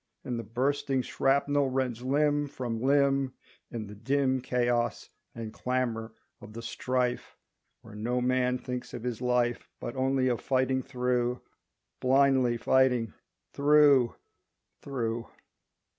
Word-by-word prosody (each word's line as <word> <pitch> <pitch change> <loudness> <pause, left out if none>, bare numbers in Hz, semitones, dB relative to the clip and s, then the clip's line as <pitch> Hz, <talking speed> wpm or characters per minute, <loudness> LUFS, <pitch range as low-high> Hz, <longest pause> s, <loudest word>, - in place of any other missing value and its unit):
And 120 -2 -3
the - - -4
bursting 130 +3 0
shrapnel 140 +1 +1
rends 130 -3 -1
Limb 145 +2 +1
from 120 -5 -4
limb 135 0 +2 0.3
In 115 -3 -5
the 105 - -10
dim 130 +4 0
Chaos 120 -1 0 0.2
and 115 -2 -6
clamor 120 -3 -2 0.3
of 105 - -11
the 115 +1 -7
strife 125 +1 -2 0.5
Where 110 - -13
no 120 +4 -1
man 125 0 +1
thinks 125 -1 -6
of 120 - -7
his 125 -2 -3
life 125 -1 0
But 120 - -5
only 130 0 +1
of 120 -2 0
fighting 130 0 +1
through, 125 -2 -1 0.6
Blindly 130 -2 +3
fighting 125 -2 +2 0.4
through, 145 -4 +5 0.7
through! 115 -4 -3
125 Hz, 125 wpm, -29 LUFS, 120-135 Hz, 0.7 s, through